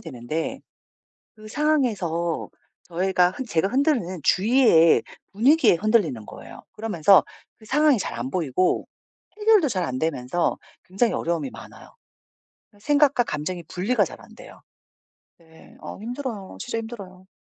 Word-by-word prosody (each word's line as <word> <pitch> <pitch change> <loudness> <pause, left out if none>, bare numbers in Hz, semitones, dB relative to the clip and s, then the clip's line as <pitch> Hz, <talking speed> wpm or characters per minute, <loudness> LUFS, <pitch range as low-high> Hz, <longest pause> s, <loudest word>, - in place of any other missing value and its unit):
되는데 155 - -5 0.7
그 215 -1 -13
상황에서 215 - -1 0.4
저희가 180 +1 +1
한 265 - -6
제가 170 -2 0
흔들리는 245 - 0
주위에 195 - +4 0.3
분위기에 260 - +4
흔들리는 170 - +1
거예요. - - -12
그러면서 200 -4 +3 0.3
그 220 - -18
상황이 290 +2 +3
잘 - - -4
안 120 +3 -4
보이고 175 +2 0 0.5
해결도 420 -7 +4
잘 190 -7 -2
안 130 -5 -3
되면서 160 +1 -1 0.3
굉장히 200 +6 0
어려움이 165 -5 -2
많아요. - - -14 0.8
아 205 - -22
생각과 285 +1 +3
감정이 170 +1 -4
분리가 190 +10 0
잘 - - -10
안 - - -17
돼요. - - -14 0.8
네. 160 -1 -19
어 - - -9
힘들어요. 235 -4 -6
진짜 245 -2 -4
힘들어요. 195 -5 -9
195 Hz, 305 characters per minute, -23 LUFS, 170-245 Hz, 0.8 s, 주위에